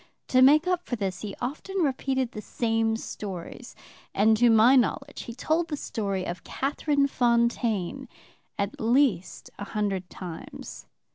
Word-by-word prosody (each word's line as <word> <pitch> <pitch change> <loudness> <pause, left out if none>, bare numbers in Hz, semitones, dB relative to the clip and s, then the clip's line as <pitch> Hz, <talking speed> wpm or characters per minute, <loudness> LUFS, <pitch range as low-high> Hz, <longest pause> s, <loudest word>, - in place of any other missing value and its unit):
To 255 - +4
make 300 +5 +6
up 360 -1 0
for 245 - -3
this 190 -4 -3
he 205 -2 -5
often 305 +10 -4
repeated 265 -5 0
the 210 - -7
same 225 0 0
stories, 190 -6 -7 0.4
and 220 +2 +5
to 240 +1 +5
my 225 +4 +6
knowledge 275 +3 0
he 235 - -8
told 320 +6 0
the 300 -3 -3
story 200 -7 -3
of 175 0 -5
Catherine 280 +1 0
Fontaine 235 -6 0 0.5
at 200 +1 -3
least 230 -6 +1
a - - -4
hundred 200 -3 -2
times. 175 -3 -9
235 Hz, 145 wpm, -26 LUFS, 205-275 Hz, 0.5 s, make